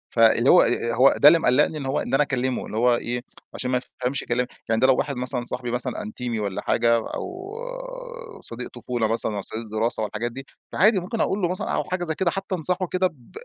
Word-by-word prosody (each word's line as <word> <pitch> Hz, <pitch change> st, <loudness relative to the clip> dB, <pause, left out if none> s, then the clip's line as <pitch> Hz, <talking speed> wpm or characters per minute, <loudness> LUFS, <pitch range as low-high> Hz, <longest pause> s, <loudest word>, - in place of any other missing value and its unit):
فاللي 115 Hz, +2 st, +5 dB
هو 180 Hz, -, +8 dB
آآ، 115 Hz, 0 st, +1 dB
هو 130 Hz, +3 st, +5 dB
ده 145 Hz, -, +7 dB
اللي 165 Hz, +2 st, +8 dB
مقلّقني 150 Hz, +3 st, +3 dB
إن 140 Hz, -, -5 dB
هو 135 Hz, +3 st, 0 dB
إن -, -, -4 dB
أنا 140 Hz, -, +5 dB
أكلّمه 130 Hz, -2 st, -1 dB
اللي 110 Hz, -, -6 dB
هو 120 Hz, +1 st, +4 dB
إيه، 120 Hz, +1 st, -3 dB, 0.3 s
عشان 125 Hz, 0 st, -3 dB
ما 125 Hz, -, +2 dB, 0.2 s
يفهمش 130 Hz, +2 st, -1 dB
كلام. 125 Hz, +1 st, 0 dB, 0.2 s
يعني 115 Hz, +1 st, +2 dB
ده 130 Hz, -, +6 dB
لو 130 Hz, -, +5 dB
واحد 145 Hz, -2 st, -1 dB
مثلًا 125 Hz, 0 st, -2 dB
صاحبي 120 Hz, 0 st, -3 dB
مثلًا 125 Hz, 0 st, -3 dB
أنتيمي 115 Hz, +2 st, -4 dB
والّا 100 Hz, -2 st, -3 dB
حاجة 115 Hz, 0 st, +3 dB, 0.2 s
أو 370 Hz, +2 st, -6 dB, 0.9 s
صديق -, -, -5 dB
طفولة 120 Hz, -3 st, -1 dB
مثلًا 110 Hz, -1 st, -1 dB
أو 100 Hz, -, -2 dB
صديق 110 Hz, +4 st, -6 dB
دراسة 110 Hz, 0 st, 0 dB
والحاجات 115 Hz, +3 st, -3 dB
دي، 135 Hz, +2 st, -8 dB, 0.3 s
فعادي 210 Hz, 0 st, +4 dB
ممكن 215 Hz, +5 st, -3 dB
أقول 200 Hz, -, 0 dB
له 175 Hz, -, +2 dB
مثلًا 180 Hz, -, -3 dB
أو -, -, 0 dB
حاجة 185 Hz, -1 st, -3 dB
زي 160 Hz, -2 st, -2 dB
كده 175 Hz, -3 st, +1 dB
حتّى 195 Hz, 0 st, -3 dB
أنصحه 180 Hz, +2 st, -1 dB
كده 185 Hz, +1 st, +1 dB
ب 130 Hz, -10 st, -17 dB
125 Hz, 230 wpm, -24 LUFS, 120-170 Hz, 0.9 s, هو